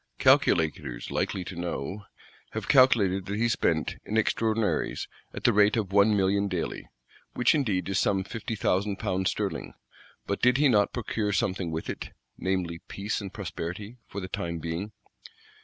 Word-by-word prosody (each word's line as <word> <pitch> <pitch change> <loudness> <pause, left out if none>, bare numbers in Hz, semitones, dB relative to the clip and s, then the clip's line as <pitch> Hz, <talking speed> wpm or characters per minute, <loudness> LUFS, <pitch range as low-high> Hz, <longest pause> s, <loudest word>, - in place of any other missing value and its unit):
"Calculators 75 -6 +2
likely 95 - -1
to 90 - -7
know" 90 +3 -4 0.5
have - - -4
calculated 100 -8 +4
that 100 +1 -2
he 120 +2 +2
spent, 80 -8 0
in 110 - -2
extraordinaries, 110 0 0 0.2
"at - - -8
the - - +5
rate 105 +2 +4
of 100 -4 -1
one 100 +1 +5
million 100 +1 +2
daily;" 90 -4 -4 0.5
which 125 - +4
indeed 105 - 0
is 95 -1 +1
some 95 -2 +2
fifty 110 +2 -5
thousand 100 0 +1
pounds 95 -3 0
sterling: - - -3 0.5
but 100 - -2
did 125 +1 +5
he 145 +1 +5
not 105 -5 +3
procure 110 -3 -2
something 95 -3 0
with 80 0 -4
it; - - -6 0.2
namely 90 -3 -2
peace 105 +3 -3
and 100 -2 -6
prosperity, 100 +3 -6
for 100 - -6
the 95 - -5
time 85 -2 -3
being? 85 +6 -4
100 Hz, 160 wpm, -28 LUFS, 90-110 Hz, 0.5 s, the